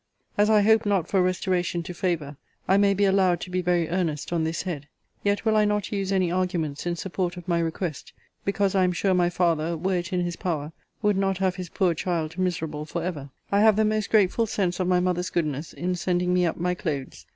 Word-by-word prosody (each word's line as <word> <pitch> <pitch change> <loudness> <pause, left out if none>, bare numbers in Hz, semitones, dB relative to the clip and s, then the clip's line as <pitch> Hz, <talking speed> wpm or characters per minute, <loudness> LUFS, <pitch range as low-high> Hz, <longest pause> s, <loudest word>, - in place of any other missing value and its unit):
As 205 +1 +3
I 210 -1 +5
hope 220 0 +4
not 195 -5 +1
for 195 - +2
restoration 180 -1 0
to 180 - -6
favour, 165 -5 -2 0.3
I 190 - +4
may 200 0 +4
be 200 +1 +3
allowed 190 -3 +3
to 180 - -7
be 185 0 0
very 175 -2 +1
earnest 165 -3 -2
on 165 -2 +1
this 160 +1 -2
head: 155 -6 -5 0.4
yet 205 +2 0
will 220 -1 +3
I 215 - +5
not 210 -1 0
use 195 -2 -2
any 185 -3 +2
arguments 175 -5 -1
in 175 - 0
support 180 0 -3
of 175 0 -9
my 170 -1 +1
request, 165 -2 -3 0.3
because 200 -1 +1
I 190 -1 +3
am 180 0 +2
sure 190 +2 +1
my 175 -1 +3
father, 170 -2 0
were 185 +3 0
it 175 +2 -4
in 180 -1 0
his 175 -1 -3
power, 155 -4 -3 0.3
would 210 -2 +3
not 195 -1 +1
have 190 -1 0
his 180 -2 -6
poor 180 -1 +1
child 165 0 -2
miserable 160 -5 -2
for 170 +1 -4
ever. 150 -6 -4 0.2
I 200 - +3
have 220 -1 +6
the 215 +1 +3
most 215 -1 0
grateful 215 +2 +3
sense 190 -4 -1
of 185 - 0
my 180 -1 +3
mother's 180 0 0
goodness 155 -3 -2
in 180 +2 -2
sending 180 0 0
me 180 -1 +3
up 165 - -2
my 180 +1 0
clothes. 135 - -5
180 Hz, 230 wpm, -25 LUFS, 170-195 Hz, 0.4 s, have